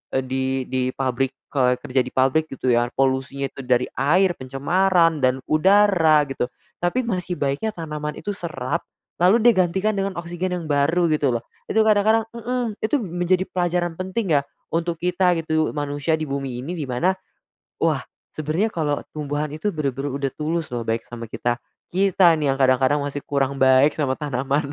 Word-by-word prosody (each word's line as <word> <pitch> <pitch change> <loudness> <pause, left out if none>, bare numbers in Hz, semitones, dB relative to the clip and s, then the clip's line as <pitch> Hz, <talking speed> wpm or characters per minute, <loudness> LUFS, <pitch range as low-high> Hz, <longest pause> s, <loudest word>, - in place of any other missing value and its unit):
eee, 130 - +1
di 130 +1 -2 0.3
di 130 0 0 0.2
pabrik 135 0 -1 0.2
kalau 125 -3 +3
kerja 130 +1 0
di - - -5
pabrik, 135 +5 +2
gitu, 130 -2 0
ya, 120 0 +2
polusinya 135 +1 0
itu - - -7
dari 125 0 +2
air, 175 +7 +3
pencemaran 165 +5 +2
dan 130 +1 +3
udara, 165 -3 +4
gitu. 130 -2 -2 0.3
Tapi 205 +9 0
masih 180 -5 -2
baiknya 140 +10 -1
tanaman 150 -2 -5
itu 205 - -4
serap 170 -4 -3 0.4
lalu 185 +5 +6
dia 240 - +8
gantikan 190 +3 +1
dengan 195 -2 -2
oksigen 175 +2 -3
yang 170 - -6
baru, 155 +4 +2
gitu, 150 -2 +2
lho. 115 - -12 0.2
Itu 220 +1 +3
kadang-kadang 220 +1 +3
mhm, 235 0 -2
itu 220 +7 +1
menjadi 180 -4 0
pelajaran 175 -2 -1
penting, 185 +1 -2
ya, 145 - +4 0.3
untuk 165 0 -1
kita, 180 0 +2
gitu, 155 -1 0
manusia 145 +2 -1
di 155 - -3
bumi 135 -3 -4
ini, 135 +8 -5
di 150 -6 -5
mana, 150 +10 +1 0.7
wah, - - +1 0.3
sebenernya 155 +7 0
kalau 150 -8 -1 0.2
tumbuhan 150 0 -2
itu 205 +7 -1
bener-bener 140 -4 -2
udah 140 0 -2
tulus, 160 +1 -2
lho, 120 -1 -2
baik 115 0 -2
sama 115 -2 -8
kita. 120 0 -1 0.3
Kita, 185 -2 +4
nih, 150 -3 +1
yang 135 - -7
kadang-kadang 130 +2 +3
masih 145 0 -4
kurang 140 -1 0
baik 130 +2 +4
sama 135 -4 -1
tanaman, 140 0 -1
155 Hz, 170 wpm, -22 LUFS, 135-180 Hz, 0.7 s, dia